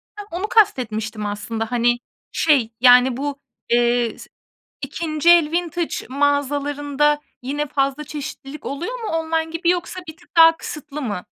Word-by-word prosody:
Hah, 415 Hz, -1 st, -8 dB
onu 360 Hz, +5 st, -3 dB
kast 435 Hz, -, +4 dB
etmiştim 215 Hz, -2 st, -4 dB
aslında. 220 Hz, +2 st, -4 dB
Hani 240 Hz, 0 st, +2 dB, 0.3 s
şey 280 Hz, -8 st, +2 dB
yani 250 Hz, 0 st, +6 dB
bu, 280 Hz, 0 st, -4 dB, 0.3 s
eee, 240 Hz, -1 st, +2 dB
s -, -, -11 dB, 0.5 s
2. 310 Hz, +3 st, -1 dB
el 335 Hz, -3 st, +6 dB
vintage 345 Hz, 0 st, -2 dB
mağazalarında 285 Hz, +1 st, +1 dB, 0.2 s
yine 290 Hz, +4 st, -3 dB
fazla 275 Hz, +1 st, -1 dB
çeşitlilik 290 Hz, -1 st, -8 dB
oluyor 350 Hz, -, -4 dB
mu 450 Hz, -, -5 dB
online 325 Hz, -1 st, -1 dB
gibi 330 Hz, +1 st, 0 dB
yoksa 355 Hz, +1 st, -1 dB
bir 315 Hz, 0 st, -9 dB
tık -, -, -24 dB
daha 330 Hz, 0 st, +8 dB
kısıtlı 300 Hz, -1 st, -7 dB
mı? 205 Hz, -8 st, -4 dB
290 Hz, 145 wpm, -21 LUFS, 250-325 Hz, 0.5 s, daha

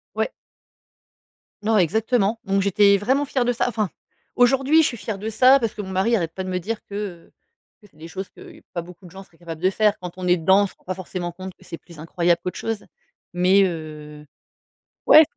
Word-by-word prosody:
Ouais. -, -, -1 dB, 1.3 s
Non, 220 Hz, +1 st, +2 dB
exactement, 220 Hz, +4 st, +1 dB
donc 195 Hz, -1 st, +1 dB
j'étais 200 Hz, +1 st, +4 dB
vraiment 265 Hz, +8 st, +1 dB
fière 265 Hz, -3 st, -1 dB
de 245 Hz, -, +1 dB
ça. 235 Hz, -, 0 dB
Enfin, 215 Hz, -4 st, -1 dB, 0.5 s
aujourd'hui, 270 Hz, +6 st, +4 dB
je -, -, +3 dB
suis 235 Hz, -, -4 dB
fière 215 Hz, -1 st, -5 dB
de 210 Hz, +3 st, -4 dB
ça, 255 Hz, +5 st, +6 dB
parce 230 Hz, -3 st, -1 dB
que 210 Hz, -, -6 dB
mon 190 Hz, -, -8 dB
mari 190 Hz, +5 st, +1 dB
arrête 165 Hz, -6 st, -2 dB
pas 190 Hz, -, -5 dB
de 185 Hz, -, -5 dB
me 180 Hz, -, -1 dB
dire 215 Hz, +5 st, -5 dB
que, 200 Hz, -, -11 dB, 0.4 s
heu, -, -, -34 dB, 0.5 s
que 210 Hz, -, -18 dB
c'est -, -, -32 dB
des 165 Hz, +2 st, -10 dB
choses 190 Hz, +3 st, -6 dB
que, -, -, -14 dB
pas 170 Hz, -, -2 dB
beaucoup 180 Hz, +2 st, -14 dB
de 175 Hz, -, -13 dB
gens 190 Hz, +2 st, -10 dB
seraient 170 Hz, -3 st, -25 dB
capables 165 Hz, -2 st, -8 dB
de 185 Hz, -, +3 dB
faire. 210 Hz, +1 st, +2 dB
Quand 180 Hz, -1 st, -6 dB
on 185 Hz, -1 st, -4 dB
est 180 Hz, -, +5 dB
dedans, 190 Hz, +5 st, +4 dB
on -, -, 0 dB
se -, -, -15 dB
rend -, -, -31 dB
pas 185 Hz, -, -3 dB
forcément 180 Hz, -1 st, -5 dB
compte 185 Hz, +2 st, -9 dB
que -, -, -20 dB
c'est 170 Hz, -2 st, -8 dB
plus 165 Hz, -2 st, -16 dB
incroyable 170 Hz, +1 st, 0 dB
qu'autre 180 Hz, -, -4 dB
chose, 225 Hz, -2 st, -3 dB, 0.5 s
mais, 185 Hz, +3 st, +4 dB
heu, 150 Hz, -4 st, -5 dB, 0.8 s
ouais! 310 Hz, -, +9 dB
190 Hz, 230 wpm, -22 LUFS, 175-220 Hz, 1.3 s, ouais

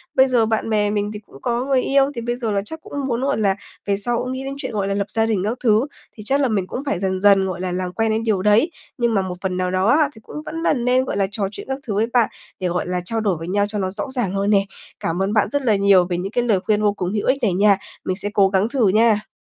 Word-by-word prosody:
Bây 265 Hz, 0 st, +6 dB
giờ 245 Hz, -3 st, +3 dB
bạn 220 Hz, 0 st, -1 dB
bè 210 Hz, -1 st, +2 dB
mình 205 Hz, 0 st, -1 dB
thì 210 Hz, -, -6 dB
cũng 170 Hz, -10 st, -17 dB
có 240 Hz, +1 st, -1 dB
người 270 Hz, -2 st, +2 dB
yêu, 275 Hz, +1 st, +2 dB
thì 235 Hz, -, -3 dB
bây 240 Hz, +1 st, -2 dB
giờ 235 Hz, -3 st, -3 dB
là 200 Hz, -1 st, +1 dB
chắc 320 Hz, +6 st, -8 dB
cũng -, -, -13 dB
muốn, 240 Hz, -1 st, -1 dB
gọi 280 Hz, +1 st, 0 dB
là, 200 Hz, -3 st, +2 dB, 0.3 s
về 200 Hz, -1 st, +1 dB
sau 235 Hz, +4 st, -1 dB
cũng 255 Hz, +2 st, -3 dB
nghĩ 260 Hz, +1 st, -4 dB
đến 270 Hz, 0 st, -4 dB
chuyện, -, -, -5 dB
gọi 205 Hz, -3 st, -1 dB
là, 195 Hz, -, 0 dB
lập 200 Hz, 0 st, -1 dB
gia 225 Hz, 0 st, +1 dB
đình 220 Hz, -4 st, 0 dB
các 220 Hz, +5 st, -1 dB
thứ, 220 Hz, +1 st, +4 dB, 0.3 s
thì 215 Hz, -, -8 dB
chắc 275 Hz, +5 st, +1 dB
là 275 Hz, -, +3 dB
mình 200 Hz, -5 st, -1 dB
cũng 260 Hz, -, -5 dB
phải 205 Hz, -10 st, -1 dB
dần 190 Hz, -1 st, -1 dB
dần 195 Hz, -1 st, +5 dB
gọi 180 Hz, -1 st, -4 dB
là 185 Hz, -1 st, -2 dB
làm 180 Hz, 0 st, -2 dB
quen 225 Hz, +1 st, +1 dB
đến 220 Hz, +1 st, 0 dB
điều 215 Hz, -5 st, +1 dB
đấy. 210 Hz, -, +3 dB, 0.3 s
Nhưng 235 Hz, -2 st, +1 dB
mà 200 Hz, -, +2 dB
một 185 Hz, -1 st, -4 dB
phần 185 Hz, -2 st, -2 dB
nào 180 Hz, 0 st, -1 dB
đó 185 Hz, +1 st, +1 dB
á 290 Hz, +4 st, +4 dB
thì 220 Hz, -, -14 dB
cũng -, -, -12 dB
vẫn 315 Hz, -, -6 dB
là -, -, +3 dB
nên, 250 Hz, 0 st, +1 dB
gọi -, -, -3 dB
là, 195 Hz, -1 st, +2 dB
trò 200 Hz, -1 st, -1 dB
chuyện -, -, -9 dB
các 265 Hz, 0 st, -2 dB
thứ 215 Hz, -, -1 dB
với 215 Hz, +3 st, +2 dB
bạn 240 Hz, -3 st, +4 dB, 0.3 s
để, 185 Hz, -, -1 dB
gọi 175 Hz, +1 st, -2 dB
là, 180 Hz, 0 st, -1 dB
trao 225 Hz, +5 st, -2 dB
đổi 200 Hz, -6 st, 0 dB
với 165 Hz, +2 st, -7 dB
nhau 205 Hz, +2 st, +1 dB
cho 210 Hz, 0 st, -4 dB
nó 190 Hz, -1 st, -1 dB
rõ 205 Hz, +7 st, -4 dB
ràng 235 Hz, -8 st, -1 dB
hơn 200 Hz, +1 st, 0 dB
nè. 200 Hz, -2 st, +4 dB, 0.3 s
Cảm 165 Hz, +3 st, -2 dB
ơn 195 Hz, +2 st, 0 dB
bạn 215 Hz, -2 st, +3 dB
rất 285 Hz, +1 st, 0 dB
là 230 Hz, -6 st, +2 dB
nhiều 195 Hz, -2 st, +5 dB
về 175 Hz, -1 st, -2 dB
những 190 Hz, +3 st, -4 dB
cái 245 Hz, +1 st, +1 dB
lời 220 Hz, -5 st, +2 dB
khuyên 210 Hz, +2 st, 0 dB
vô 205 Hz, -1 st, +2 dB
cùng 180 Hz, -3 st, -3 dB
hữu 210 Hz, -, -1 dB
ích 260 Hz, -, +3 dB
này 200 Hz, -5 st, +2 dB
nha. 200 Hz, +2 st, +4 dB, 0.3 s
Mình 185 Hz, -, -1 dB
sẽ 200 Hz, +2 st, -4 dB
cố 195 Hz, -2 st, +4 dB
gắng 195 Hz, +3 st, +1 dB
thử 245 Hz, -5 st, +2 dB
nha. 215 Hz, 0 st, +3 dB
210 Hz, 320 wpm, -21 LUFS, 195-240 Hz, 0.3 s, Bây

